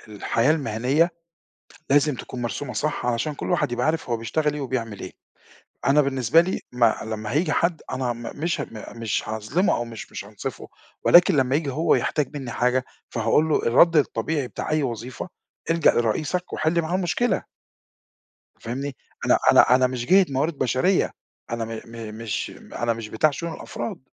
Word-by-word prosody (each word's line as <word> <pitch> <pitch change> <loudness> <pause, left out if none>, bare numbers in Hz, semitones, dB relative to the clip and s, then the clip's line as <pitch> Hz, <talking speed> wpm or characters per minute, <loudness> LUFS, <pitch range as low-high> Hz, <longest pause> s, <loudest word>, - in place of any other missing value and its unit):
الحياة 115 +7 +2
المِهنية 140 +3 +1 0.8
لازم 145 +1 +4
تكون 125 +1 -7
مرسومة 125 +2 -3
صح 150 -4 -2
علشان 125 +5 0
كلّ - - -5
واحد - - +1
يبقى 120 +3 0
عارف 160 -5 -1
هو 115 - +2
بيشتغل 150 +6 -1
إيه 150 - -4
وبيعمل 120 -6 -3
إيه، 95 - -7 0.8
أنا 145 +2 +5
بالنسبة 135 +2 +3
لي 185 +2 -2
ما 120 -2 +3
لما 110 0 -4
هييجي 155 +3 +1
حد 170 +1 +1
أنا 130 -2 -1
م 120 - -10 0.2
مش 170 +4 -1
ه - - -5 0.3
مش 115 -2 -2
هاظلِمه 110 - +1
أو 120 - -2
مش 115 -2 -9
مش - - -6
هانصِفه - - -7 0.4
ولكن 175 0 +7
لما 135 -1 +2
ييجي 150 -1 0
هو 155 +5 +2
يحتاج 150 -1 -1
منّي 130 -4 -6
حاجة 125 +2 +1 0.2
فهاقول 115 +7 +2
له 150 - +2
الرَّد 165 +8 +5
الطبيعي 140 +1 0
بتاع - - -6
أي 155 -1 +2
وظيفة، 125 +6 -5 0.4
الجَأ 165 -2 +5
لرئيسك 150 +10 -1
وحِل 160 +2 +1
معاه 165 +2 -2
المشكلة. 190 +6 0 1.2
فاهمني؟ 135 +4 -4 0.3
أنا - - +5
أنا - - +6
أنا 130 0 +4
مش 125 -1 -4
جِهة 190 +5 +6
موارد 140 +3 -1
بشرية، 130 +9 +2 0.4
أنا 115 -1 -2
م 115 0 -6
م 115 -2 -8
مش 110 -1 -3 0.2
أنا، 120 0 0
مش 115 -1 -6
بتاع 110 +9 +2
شؤون 170 +3 -5
الأفراد، 120 - -6
130 Hz, 170 wpm, -24 LUFS, 115-155 Hz, 1.2 s, ولكن